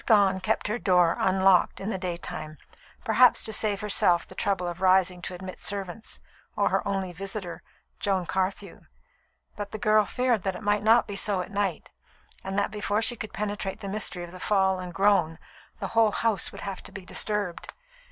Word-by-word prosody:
Gone 200 -4 +4
kept 190 - -1
her 215 +3 -2
door 180 -5 +3
unlocked 190 -1 +3
in 195 +3 -3
the 190 - -2
daytime, 170 -3 -5 0.5
perhaps 245 +1 +4
to 220 - -2
save 210 -1 0
herself 185 -4 +3
the - - -10
trouble 190 -2 -1
of 175 +1 -6
rising 185 -1 +3
to 180 - -5
admit 185 +1 -9
servants, 200 +2 -4 0.4
or - - +2
her - - 0
only 195 -2 -2
visitor, 190 -2 -5 0.4
Joan 190 -3 0
Carthew; 190 +1 -3 0.7
but 205 -1 -5
the 215 - -6
girl 215 0 +3
feared 250 -3 0
that 190 0 -2
it 215 - -8
might 205 0 +2
not 225 +3 +5
be 205 - -6
so 200 -1 0
at 180 - -8
night, 200 -4 -2 0.5
and 195 +1 -4
that 200 0 +1
before 210 +1 -1
she 240 - +2
could 215 -1 -7
penetrate 205 -2 -4
the 200 - -6
mystery 195 -3 -2
of 175 - -9
the 185 - -11
fall 190 -1 +2
and 180 -1 -6
the 175 - -12
groan, 195 -5 +3 0.4
the - - -4
whole 225 -2 +3
house 225 -5 +1
would - - -10
have 195 -2 -5
to - - -13
be 195 -2 -9
disturbed. 205 -3 -2
195 Hz, 195 wpm, -27 LUFS, 185-210 Hz, 0.7 s, not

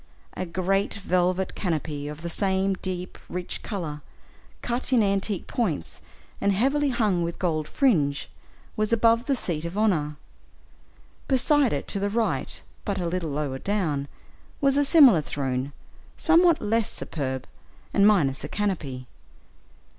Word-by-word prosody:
A 185 - -4
great 190 +3 0
velvet 185 -1 0
canopy 155 -5 -3
of 150 +2 -8
the - - -3
same 190 +1 +1
deep, 185 -1 -5
rich 180 0 -4
color, 160 -8 -5 0.6
cut 245 +3 -2
in 240 -4 +5
antique 195 -1 +1
points, 175 - -2 0.4
and 200 0 +3
heavily 275 +8 +2
hung 210 -8 +1
with 170 0 -3
gold 155 -4 -1
fringe, 155 - +1 0.5
was 215 0 0
above 230 +1 +3
the 275 - +2
seat 165 -9 -3
of 170 +4 -5
honor. 165 -9 +1 1.1
Beside 270 -1 +3
it, - - -2
to 200 - -1
the 200 +1 0
right, 225 +2 -1 0.2
but 200 -2 -2
a 180 - -2
little 170 -1 -2
lower 140 -2 -3
down, 160 -9 -1 0.5
was 275 -1 +3
a 285 - +4
similar 275 - +7
throne, 135 -2 -3 0.5
somewhat 335 0 +4
less 225 +1 +1
superb, 130 -4 -4 0.5
and 200 0 +5
minus 145 -12 +2
a - - -3
canopy. 155 -11 -2
190 Hz, 140 wpm, -25 LUFS, 155-225 Hz, 1.1 s, similar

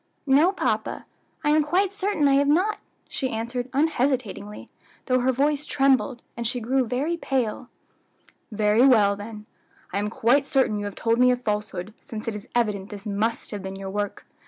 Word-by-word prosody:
"No, 290 +6 +5
papa. 390 - -2 0.4
I 295 - +3
am 310 +1 +5
quite 370 +6 +1
certain 395 -7 +1
I 275 - +4
have 280 0 +3
not," 370 +9 +2 0.3
she 260 - -3
answered 245 +2 -3
unhesitatingly, 260 -8 -1 0.4
though 255 -1 +2
her 255 +1 +2
voice 285 +3 +1
trembled, 270 -3 +1
and 235 -1 -2
she 245 +2 -2
grey 260 +4 +1
very 265 +8 -1
pale. 255 -5 -2 0.8
"Very 210 +2 +3
well, 215 -7 +5
then, 210 +1 -9 0.5
I - - 0
am 205 +1 -1
quite 260 +6 +2
certain 255 -6 +2
you 205 - -4
have 205 - -5
told 230 +1 +1
me 250 0 +6
a 250 - +3
falsehood, 210 -4 -3
since 220 -1 -8
it 225 - -2
is 210 - -9
evident 210 -4 0
this 205 0 -9
must 215 +2 -2
have 205 -2 -5
been 190 0 -6
your 195 0 -6
work. 205 0 -3
245 Hz, 180 wpm, -25 LUFS, 210-275 Hz, 0.8 s, me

